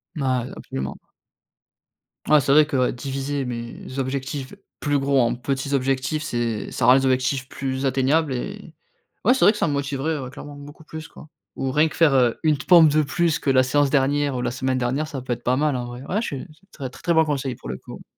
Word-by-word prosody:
M 150 - -3
ah, 130 -2 0
absolument. 65 +1 -6 1.3
Ouais, 150 - +7
c'est 140 0 +2
vrai 155 +1 +7
que, 145 -2 -2
ouais, 125 -1 +2
diviser 135 +2 -3
mes 120 +2 -6
objectifs 135 +1 -3 0.3
plus 145 -1 +1
gros 140 0 +2
en 120 0 +2
petits 135 +2 -3
objectifs 135 +3 0
c'est 120 -7 -2
ça - - -1
rend 125 - +8
les 135 0 +3
objectifs 130 0 +1
plus 135 0 -3
atteignables 135 +3 +2
et 125 - -6 0.5
ouais, 245 - +6
c'est 260 - 0
vrai - - +8
que 210 - -7
ça - - +1
me 145 - -1
motiverait, 140 +2 -1
ouais, 130 -2 -6
clairement, 145 +2 -10
beaucoup 145 +2 -12
plus 160 0 -8
quoi. - - -14 0.3
Ou 135 -1 -1
rien 150 +4 +3
que - - -11
faire 135 -7 +4
une 155 -2 +3
pompe 165 +3 +6
de 155 +1 +3
plus 170 +2 0
que 140 - -2
la 130 -1 +5
séance 140 +2 +2
dernière 145 0 +1
ou - - -2
la 120 -1 -1
semaine 130 +1 -1
dernière, 130 +5 -1
ça 145 -4 -6
peut 125 -1 -2
être 120 0 -8
pas 125 +1 +1
mal, 150 -1 +1
en 125 -1 -3
vrai. 120 +1 -8
Ouais 200 +9 -1
je - - -3
suis 140 - -5
c'est 195 +3 -31
tre 135 -3 -6
très 125 - -15
très 170 - +2
bon 160 -1 +4
conseil 135 -4 -2
pour - - -11
le 65 - -4
coup. - - -11
135 Hz, 235 wpm, -23 LUFS, 130-150 Hz, 1.3 s, rend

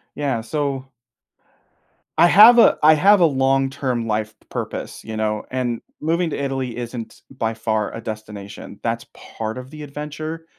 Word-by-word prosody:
Yeah, 135 -6 -1
so 135 +1 -3 1.3
I 170 - +7
have 225 +6 +8
a - - +6
I 155 +1 +8
have 200 +6 +5
a - - +7
long-term 135 -3 0
life 110 0 -2
p - - -29
purpose, - - -5
you 110 - -6
know? 110 -1 -1
And 125 -2 -2 0.2
moving 165 +2 0
to - - -3
Italy 135 -3 -3
isn't 120 -1 -7
by 115 -4 -2
far 110 -1 -2
a 115 - -6
destination. 105 -2 -8
That's 115 0 -2
part 110 +1 -6
of 130 0 -8
the 155 -1 -9
adventure, 150 +3 -6
130 Hz, 160 wpm, -21 LUFS, 110-150 Hz, 1.3 s, have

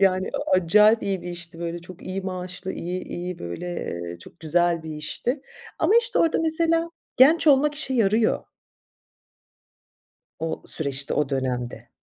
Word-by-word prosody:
Yani, 190 -1 +2
a - - -3
acayip 210 +6 +5
iyi 195 -2 -2
bir 175 - -6
işti, 175 -1 -7
böyle, 170 0 -4
çok 175 +1 -13
iyi 190 +1 -4
maaşlı, 185 0 -5
iyi 180 +2 -4
iyi, 180 0 -6
böyle, 175 - -5
eee, 85 - -5
çok 165 - -14
güzel 170 +1 +1
bir 160 - -7
işti. 195 - -2 0.4
Ama, - - +2
işte, 475 +1 -1
orada 330 - +3
mesela 330 +1 +1 0.3
genç 315 +6 +5
olmak 290 +1 +5
işe 270 -3 -1
yarıyor. 220 0 +2 1.9
O 160 0 -4
süreçte, 140 -2 +4
o 150 -2 0
dönemde. 125 -3 -3
180 Hz, 150 wpm, -24 LUFS, 165-230 Hz, 1.9 s, acayip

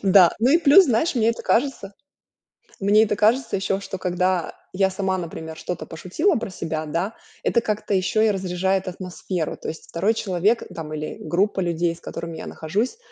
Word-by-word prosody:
Да. 190 -3 +7
Ну 240 +4 +3
и 325 - +6
плюс, 335 +4 +7
знаешь, 265 +6 +1
мне 230 -1 +3
это 230 - -6
кажется 230 -6 0 0.9
мне 210 +3 +5
это 210 - 0
кажется 230 +4 +2
ещё, 195 0 -1
что, 190 -1 -6
когда 180 -1 0 0.2
я 190 0 +2
сама, 190 -1 -1
например, 160 -2 -6
что-то 175 +1 -5
пошутила 185 - 0
про 230 -3 -3
себя, 160 -3 -4
да, 175 +8 -2 0.3
это 235 - +3
как-то 215 -2 -2
ещё 190 +3 +1
и 220 - +4
разряжает 190 0 -1
атмосферу. 180 -2 -4
То - - -8
есть 160 - -7
2 195 +7 +1
человек, 200 +3 +1
там, 155 -2 -6
или 155 0 -4
группа 195 +2 0
людей, 170 -1 0
с - - -17
которыми 165 -1 -6
я - - -7
нахожусь, 210 - -2
190 Hz, 185 wpm, -23 LUFS, 175-220 Hz, 0.9 s, Да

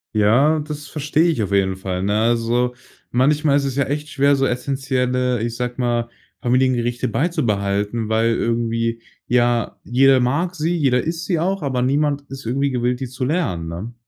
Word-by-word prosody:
Ja, 125 +10 +4
das 150 0 -6
verstehe 150 +3 +1
ich 155 -9 0
auf 100 -1 -2
jeden 95 -1 +1
Fall, 95 -1 -3
ne? 105 +2 +1
Also, 120 +2 +1 0.4
manchmal 145 +3 +2
ist 140 - +2
es 135 -1 -3
ja 140 - +2
echt 150 +2 -3
schwer, 140 0 +3
so 135 0 +1
essentielle, 125 -1 -1
ich 115 0 -3
sage 125 0 -3
mal, 120 -2 0 0.3
Familiengerichte 120 -1 +1
beizubehalten, 110 - -1
weil 115 +1 +2
irgendwie 115 0 -1 0.3
ja, 120 -2 +1
jeder 135 +2 +4
mag 145 +9 0
sie, 165 +2 0
jeder 135 -6 +2
isst 165 +1 -4
sie 175 -4 +1
auch, 190 +3 -1
aber 130 -4 -1
niemand 145 +2 +1
ist 135 -1 -9
irgendwie 140 +4 0
gewillt, 125 0 0
die 130 - -4
zu 130 +2 -6
lernen, 115 - -1
ne? 95 +8 -6
125 Hz, 175 wpm, -20 LUFS, 115-145 Hz, 0.4 s, Ja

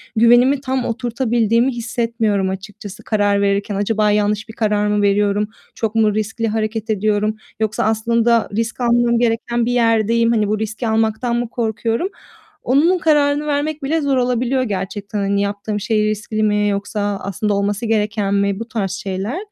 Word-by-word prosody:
güvenimin 240 +5 +5
tam 260 -2 -2
oturtabildiğimi 235 +1 +1
hissetmiyorum 230 -4 -1
açıkçası 195 +1 -8
karar 205 -2 +1
verirken. 200 0 0
Acaba 210 +1 +1
yanlış 210 +1 0
bir 220 - -8
karar 210 -2 0
mı 210 0 +1
veriyorum? 205 +1 +2 0.3
Çok 225 -1 -2
mu 215 -2 +3
riskli 220 +2 -2
hareket 220 0 -2
ediyorum 215 0 +1 0.2
yoksa 215 -1 0
aslında 230 +1 +2
risk 230 +3 -2
almam 235 0 +3
gereken 235 0 0
bir 245 - 0
yerdeyim, 230 -1 +2
hani, 215 -3 +1
bu 210 +1 -1
riski 220 +2 -3
almaktan 220 +2 0
mı 240 -1 -2
korkuyorum, 230 - -1 0.5
onun 315 +8 +3
kararını 295 -2 +2
vermek 300 +1 -1
bile 315 +4 0
zor 280 -2 +1
olabiliyor 250 +1 +1
gerçekten. 205 -1 -4
Hani, 200 0 0
yaptığım 205 +1 -3
şey 215 0 +1
riskli 215 +1 -2
mi 210 -1 +2
yoksa 205 0 -2
aslında 200 +2 -1
olması 200 +3 -1
gereken 210 -2 0
mi, 200 0 0
bu 230 - -6
tarz 210 -7 -2
şeyler. 195 - -4
220 Hz, 155 wpm, -19 LUFS, 205-235 Hz, 0.5 s, güvenimin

